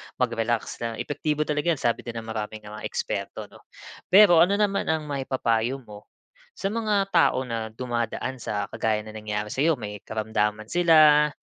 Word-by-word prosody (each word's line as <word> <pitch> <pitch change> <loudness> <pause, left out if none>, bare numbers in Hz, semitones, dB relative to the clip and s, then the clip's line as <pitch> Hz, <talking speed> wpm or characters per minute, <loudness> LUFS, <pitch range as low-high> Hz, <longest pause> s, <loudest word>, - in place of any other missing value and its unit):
mag-relax 115 -2 -1
na 115 -1 -3
epektibo 150 +4 -2
talaga 150 +3 0
'yan - - -12
sabi 120 -1 +1
din 120 -1 -7
ng 115 - -5
maraming 110 0 -5
mga 105 +1 -9
eksperto, - - -4
'no? - - -15 0.5
Pero 190 -3 +7
ano 180 +4 +5
naman 200 -1 0
ang 160 -1 0
maipapayo 130 -3 -1
mo, 105 -2 -13 0.5
sa 195 - -2
mga 210 -3 0
tao 130 - +3
na 115 -3 -4
dumadaan 120 +1 -3
sa 105 -3 -3
kagaya 110 -1 -1
ng 110 - -10
nangyari 105 -1 -4
sayo, 155 +4 +2
may 105 -4 -7
karamdaman 110 -1 -2
sila, 155 -4 +6
120 Hz, 165 wpm, -25 LUFS, 110-155 Hz, 0.5 s, Pero